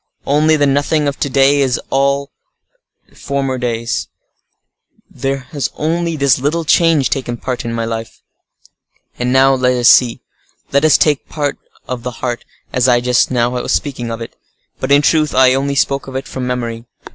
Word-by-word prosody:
Only 155 +2 +3
the 145 -1 +2
nothing 145 +2 +1
of 140 - -3
to 140 - -1
day 135 +2 +3
is 130 -2 +1
the - - -6
all 140 +1 +1 0.8
of - - -21
former 135 -2 -2
days; 115 -2 -2 1.0
there 135 0 -2
has 145 -5 -2
only 165 +1 -1
this 140 -4 +2
little 155 +5 -1
change 160 -3 +3
taken 120 -3 -2
place 125 0 -4
in 115 - -3
my 115 0 -2
life. 115 0 -6 1.0
And 125 0 0
now 135 +1 +5
let 125 -1 +1
us 120 -1 +5
see! 120 -3 +4 0.5
let 140 +1 +2
us 155 -2 +5
take 150 -3 +1
the - - -26
part 145 -2 -2 0.3
of 125 -1 -4
the 125 - -4
heart, 120 -2 -3 0.3
as 125 0 +2
I 120 -1 +4
just 125 0 +2
now 120 -1 +1
was 125 0 -3
speaking 130 -5 -2
of 115 0 -5
it. 115 - -8 0.4
But 130 - -3
in 145 +1 +5
truth, 155 0 +2
I 130 0 +5
only 140 +1 -1
spoke 140 0 0
of 135 - -8
it 135 - -4
from 130 -1 -5
memory." 120 -2 -4
135 Hz, 190 wpm, -16 LUFS, 125-145 Hz, 1.0 s, now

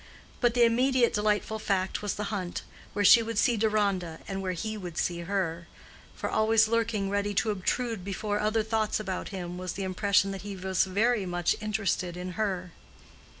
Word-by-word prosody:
But 240 -1 +2
the 240 -1 +6
immediate 250 +1 +3
delightful 210 +1 0
fact 190 -2 -1
was 205 -1 -2
the 210 - -3
hunt, 185 -3 -3 0.3
where 205 0 +1
she 230 +4 +9
would 230 -1 -4
see 240 +2 +3
Deronda, 200 -6 0
and 195 -1 -3
where 185 -1 -2
he 215 +5 -4
would 180 -5 -7
see 175 -1 0
her; 170 -2 -2 0.5
for - - -3
always 220 0 +4
lurking 220 -3 0
ready 205 0 -1
to 215 - +2
obtrude 220 +2 -1
before 205 +2 -2
other 215 +1 +1
thoughts 220 -1 0
about 190 -3 -4
him 180 -2 -5
was 185 0 -4
the 195 - -4
impression 195 +1 +2
that 195 -1 -6
he 205 -1 -6
was 190 0 +1
very 205 +2 +1
much 175 -1 +1
interested 200 -4 -1
in 180 +1 -5
her. 185 -2 -2
205 Hz, 185 wpm, -28 LUFS, 185-220 Hz, 0.5 s, she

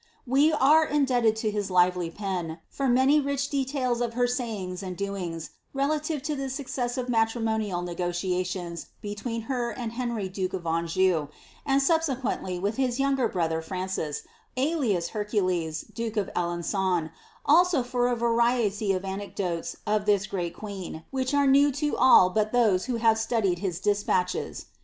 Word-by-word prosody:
We 275 +5 +4
are 305 +1 +5
indebted 250 -7 +2
lo 215 - +1
his 205 -1 -2
lively 180 -1 +3
pen, 175 -4 -4
for 275 - -1
many 260 +4 +4
rich 280 0 -1
deiaUs 265 -3 0
of 235 -1 -2
her 245 0 +3
say 245 -2 -2
ings 185 -1 -5
and 185 -2 -6
doings, 180 -5 -4 0.2
relative 295 +1 -1
to 305 +1 -1
the 270 -1 -3
successive 255 -2 -3
matrimonial 225 -5 0
negotiations 175 0 -3 0.2
be 205 0 -3
tween 230 +2 -4
her 240 0 -2
and 235 0 -5
Henry 235 -4 -2
duke 185 0 -3
of 180 -3 -4
Anjou, 165 0 +1 0.4
and 275 0 +3
subsequently 270 - 0
wiih 200 +4 0
his 255 -1 0
younger 270 -3 +2
brother 165 -5 -1
Francis, 185 -3 -3 0.3
alias 255 - +1
Hercules, 185 -7 -1
duke 230 -1 -5
of 205 - 0
Alen^on, 175 0 0 0.3
also 335 -2 +5
for 245 0 0
a 245 - +1
variety 230 -3 +1
of 185 +1 -3
anecdotes 190 -3 -3
of 210 0 0
this 205 -1 +3
great 180 -4 -3
queen, 190 -6 -7
which 260 -1 -1
are 285 0 +4
new 280 +1 +5
to 295 +2 -1
all 185 -8 +6
but 215 +1 +1
those 215 -7 +3
who 250 -2 -1
hlTt 225 -1 +3
Studied 220 -6 0
his 180 -3 -2
despatches. 190 -2 0
215 Hz, 155 wpm, -27 LUFS, 185-255 Hz, 0.4 s, all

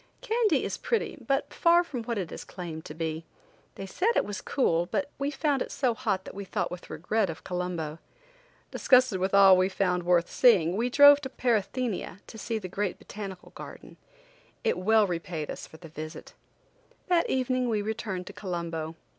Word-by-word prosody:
Kandy 445 - +2
is - - -3
pretty, 460 -2 -1
but 275 +1 0
far 345 +1 +4
from 265 -8 -5
what 235 -1 -2
it 185 -5 -3
is - - -7
claimed 165 -3 -8
to 150 - -8
be. 160 0 -3 0.5
They 195 - -6
said 385 - 0
it - - +2
was 205 -1 -5
cool, 175 -10 +1
but 285 +8 -2
we 280 +1 0
found 285 -1 0
it - - -3
so 255 -4 +1
hot 215 -6 -2
that - - -8
we 200 - -6
thought 190 - -2
with 180 0 -8
regret 190 +6 -1
of 165 - -7
Colombo. 175 -3 -4 0.7
Disgusted 255 -7 +4
with 190 +2 0
all 195 -1 +8
we 185 +1 +2
found 185 -2 0
worth 175 -1 +2
seeing 185 -9 +4
we 235 +4 0
drove 285 +2 +8
to 265 - -5
Parathenia 235 -5 -1
to 220 - -11
see 225 0 -2
the 195 -4 -5
great 195 0 -2
botanical 195 -3 -9
garden. - - -11 0.7
It - - +1
well 215 +3 +4
repaid 170 -4 -4
us - - -8
for 160 - -14
the 165 - -12
visit. 155 0 -9 0.7
That 350 -2 +2
evening 255 -1 0
we 215 -2 0
returned 210 -4 -4
to - - -9
Colombo. 170 -4 -4
200 Hz, 190 wpm, -28 LUFS, 175-255 Hz, 0.7 s, all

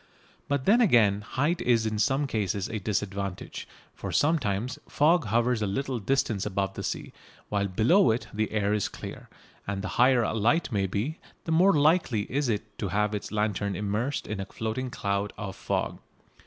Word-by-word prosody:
But 140 -2 -1
then 230 +5 +5
again 110 - +4
height 145 +10 -1
is 115 -2 +2
in 110 -1 -1
some 135 +5 +2
cases 100 -6 -1
a 110 - -3
disadvantage, 100 -2 -3 0.3
for - - -6
sometimes 130 -4 +1
fog 160 +1 +3
hovers 115 +2 +1
a 105 - +1
little 125 +5 -2
distance 110 -3 0
above 95 -1 -1
the - - -6
sea, - - -4 0.4
while 100 -1 0
below 115 - +4
it 115 +2 0
the 110 +1 -1
air 105 -1 +1
is 105 -2 +1
clear, - - -9 0.4
and 100 0 -3
the - - -2
higher 125 -1 +5
a - - -1
light 120 +9 +2
may 100 -3 +1
be 115 - -3 0.2
the 165 - -4
more 180 +5 +5
likely 150 - +3
is 140 -2 +1
it 110 0 -3
to 100 - -1
have 105 +2 0
its 105 - -4
lantern 105 -2 -1
immersed 105 +8 -2
in 105 -2 -4
a 95 - -3
floating 115 +4 -3
cloud 100 -2 -2
of 100 -2 -5
fog. - - -2
110 Hz, 180 wpm, -27 LUFS, 100-135 Hz, 0.4 s, then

